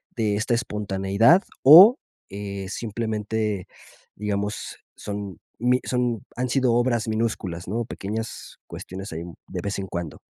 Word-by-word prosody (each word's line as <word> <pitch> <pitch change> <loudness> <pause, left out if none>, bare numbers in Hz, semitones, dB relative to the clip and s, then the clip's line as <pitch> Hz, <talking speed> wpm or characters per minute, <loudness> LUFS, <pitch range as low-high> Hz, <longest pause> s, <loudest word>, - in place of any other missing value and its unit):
de 110 -3 0
esta 110 +3 0
espontaneidad 105 - +2 0.2
o, 185 - +10 0.3
eh, 100 -1 -6
simplemente, 110 -2 -3 0.5
digamos, 105 0 -3 0.2
son 100 -3 -6 0.2
mi 125 +1 +3
son 125 -4 -1
han 125 0 -2
sido 130 -2 +2
obras 120 -2 +1
minúsculas, 110 -6 -2
¿no? 115 +5 -2
Pequeñas 110 +1 -6
cuestiones 95 0 -8
ahí 80 +1 -5 0.2
de - - -5
vez 100 0 -3
en 95 - -4
cuando. 85 -5 -5
105 Hz, 130 wpm, -24 LUFS, 100-120 Hz, 0.5 s, o